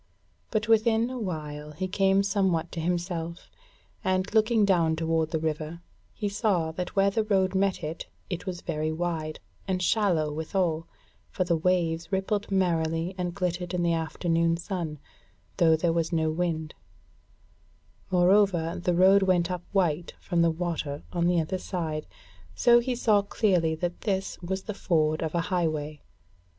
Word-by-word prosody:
But 215 -1 -1
within 225 +1 +3
a 255 - -4
while 150 -6 -5
he 185 +5 -3
came 195 +1 +3
somewhat 190 -5 0
to 170 - -5
himself, 170 0 -3 0.5
and, 185 +1 0
looking 220 -1 +4
down 170 -5 +3
toward 160 0 0
the 160 - -1
river, 155 +1 -3 0.3
he 210 - -2
saw 200 -6 0
that 180 +5 -5
where 195 0 +4
the 220 +2 +1
road 190 -3 +1
met 195 0 +1
it, 155 +2 -5 0.2
it 180 +1 -5
was 180 -2 -4
very 155 -1 -2
wide, 160 -2 -3 0.3
and 185 -1 0
shallow 180 -6 +1
withal, 160 +1 -1 0.4
for 185 - -1
the 175 -1 +1
waves 165 0 0
rippled 200 +2 -1
merrily 170 -2 0
and 175 -2 -3
glittered 180 -1 -2
in 175 - 0
the 170 -1 +2
afternoon 165 0 0
sun, 170 -4 -4 0.6
though 165 -3 +5
there 165 +1 +1
was 165 0 0
no 160 -2 +1
wind; 160 -2 -2 1.4
moreover 180 -2 +3
the 175 -1 +1
road 190 +3 +6
went 185 -2 +2
up 180 -1 -3
white 175 -4 0
from 175 -2 0
the 170 - +4
water 160 -4 -3
on 170 -1 +1
the 175 -1 +3
other 175 +4 -2
side, 160 -5 -4 0.5
so 240 - +6
he 245 +1 -1
saw 215 -4 +3
clearly 185 -6 +1
that 175 +2 -4
this 195 -3 -2
was 190 +2 -3
the 210 - -4
ford 155 -5 +1
of 160 0 -2
a 170 - +2
highway. 155 -5 -2
175 Hz, 160 wpm, -27 LUFS, 160-195 Hz, 1.4 s, road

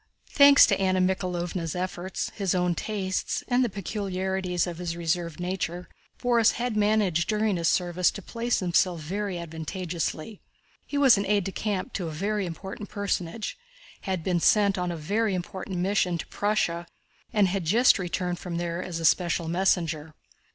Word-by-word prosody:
Thanks 280 -1 +8
to 195 -3 +1
Anna 185 -1 +2
Mikháylovna's 180 -2 -1
efforts, 185 +1 -3
his 195 -3 0
own 180 -1 +2
tastes, 190 +1 -2
and 250 0 +3
the 240 - 0
peculiarities 190 -2 -2
of 175 -2 -6
his 170 -1 -3
reserved 170 0 -2
nature, 180 -1 -3 0.3
Borís 235 -3 +3
had 240 -1 -2
managed 205 -5 +2
during 215 -2 +1
his 170 -2 0
service 180 0 +2
to 200 - -7
place 235 +2 -1
himself 180 -1 +2
very 190 +4 -3
advantageously. 170 +3 -4 0.5
He 285 - -3
was 265 -7 +6
aide 200 0 +1
de 195 - -4
camp 205 +3 -3
to 180 -4 -3
a - - -4
very 200 +4 -1
important 190 +4 -7
personage, 200 - -3 0.5
had 185 -3 -1
been 180 -1 +1
sent 200 +2 +4
on 180 -1 -2
a 170 - -4
very 200 +6 0
important 185 +1 -5
mission 180 -1 +1
to - - -5
Prussia, 175 -5 -1 0.4
and 210 -4 +3
had 195 0 -1
just 230 +9 +5
returned 180 -1 -2
from 175 -2 -5
there 170 0 -2
as 175 -2 -5
a 165 - -2
special 170 -1 +2
messenger. 165 -3 0
185 Hz, 165 wpm, -26 LUFS, 175-205 Hz, 0.5 s, Thanks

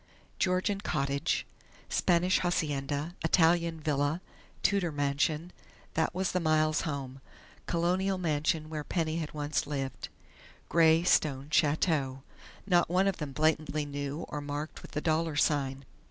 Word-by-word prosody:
Georgian 190 +2 +1
"cottage," 140 -6 -1 0.4
Spanish 180 +1 +2
hacienda, 150 -3 -1
Italian 165 0 +3
villa, 150 +1 0 0.4
Tudor 195 -4 +2
mansion 150 +4 0 0.4
that 160 +2 0
was 190 0 0
the 180 - +1
Miles 155 -1 +2
home; 135 -3 -5 0.5
Colonial 185 +3 +1
mansion 155 -1 0
where 155 -1 -4
Penny 160 0 -1
had 160 -2 -4
once 145 0 -1
lived; 135 -2 -4 0.6
grey 165 0 +5
stone 145 -4 +2
chateau.... 145 -4 +1 0.4
Not 175 -4 +3
one 185 +2 +3
of 195 - 0
them 150 -3 -5
blatantly 155 0 +1
new 145 +2 -4
or 150 - -4
marked 145 +2 -5
with - - -11
the 150 - -1
dollar 160 -1 0
sign. 140 -2 +1
155 Hz, 130 wpm, -30 LUFS, 145-170 Hz, 0.6 s, grey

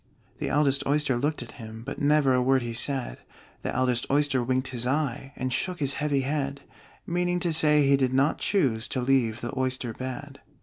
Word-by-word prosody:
The - - -2
eldest 140 -1 +2
Oyster 145 -2 +2
looked 145 +1 -1
at 120 - -12
him, 110 0 -9
But 135 +3 -6
never 145 -2 +4
a 125 - +3
word 130 0 +3
he 120 -1 -4
said: 120 - -1 0.4
The - - -3
eldest 125 -1 0
Oyster 145 -2 +2
winked 130 +2 0
his 125 -1 -1
eye, 135 -1 -1
And 130 0 -2
shook 180 +6 -1
his 140 -2 0
heavy 145 -2 +1
head 140 0 -2 0.4
Meaning 175 +1 0
to 170 -2 0
say 150 -2 +4
he 140 0 +5
did 130 -2 +1
not 135 +3 +2
choose 130 - +1
To 130 - -2
leave 125 -3 +1
the 120 - -4
oyster 130 -3 -2
bed. 135 +3 -7
135 Hz, 200 wpm, -26 LUFS, 125-145 Hz, 0.4 s, he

